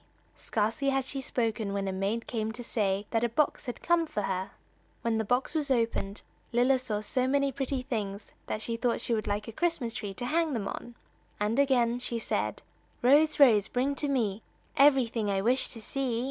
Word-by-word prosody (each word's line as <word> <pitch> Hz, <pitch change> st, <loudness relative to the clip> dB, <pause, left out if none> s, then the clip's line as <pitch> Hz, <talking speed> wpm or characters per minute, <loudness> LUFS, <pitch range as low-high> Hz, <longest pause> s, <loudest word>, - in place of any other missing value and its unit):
Scarcely 225 Hz, +6 st, 0 dB
had 270 Hz, -1 st, +1 dB
she 270 Hz, 0 st, -4 dB
spoken 225 Hz, -5 st, -1 dB
when 200 Hz, -1 st, -1 dB
a -, -, 0 dB
maid 200 Hz, +5 st, -2 dB
came 220 Hz, -2 st, -2 dB
to 245 Hz, +1 st, -7 dB
say 205 Hz, -3 st, 0 dB
that 225 Hz, 0 st, +1 dB
a 240 Hz, -, +2 dB
box 280 Hz, +3 st, 0 dB
had 245 Hz, -, -6 dB
come 340 Hz, -1 st, +3 dB
for 210 Hz, -, -3 dB
her. 190 Hz, -1 st, -2 dB, 0.5 s
When 230 Hz, -1 st, +1 dB
the -, -, +1 dB
box 245 Hz, +5 st, 0 dB
was 300 Hz, -3 st, -1 dB
opened, 230 Hz, -5 st, 0 dB, 0.3 s
Lilla 250 Hz, +2 st, +3 dB
saw 215 Hz, -5 st, -2 dB
so 255 Hz, +4 st, 0 dB
many 280 Hz, +1 st, +2 dB
pretty 270 Hz, -1 st, -2 dB
things 210 Hz, -5 st, -4 dB, 0.2 s
that 215 Hz, -, -3 dB
she 230 Hz, -1 st, -2 dB
thought 235 Hz, 0 st, 0 dB
she 235 Hz, -, -2 dB
would 215 Hz, -1 st, -1 dB
like 205 Hz, +1 st, -2 dB
a -, -, -5 dB
Christmas 290 Hz, -4 st, -1 dB
tree 200 Hz, -3 st, -5 dB
to 245 Hz, -, -4 dB
hang 320 Hz, +2 st, +1 dB
them 210 Hz, -5 st, -2 dB
on, 240 Hz, +4 st, -6 dB, 0.4 s
and 210 Hz, +5 st, +1 dB
again 245 Hz, -4 st, +3 dB
she 240 Hz, -1 st, -3 dB
said: 230 Hz, -, -2 dB, 0.4 s
"Rose, 295 Hz, +5 st, +5 dB
Rose, 220 Hz, -8 st, +6 dB
bring 260 Hz, +3 st, 0 dB
to 290 Hz, +1 st, -1 dB
me 225 Hz, -7 st, 0 dB, 0.3 s
Everything 260 Hz, -7 st, +4 dB
I 195 Hz, -1 st, +1 dB
wish 245 Hz, +6 st, +2 dB
to 235 Hz, -, -7 dB
see." 245 Hz, +1 st, -2 dB
235 Hz, 200 wpm, -29 LUFS, 215-270 Hz, 0.5 s, Rose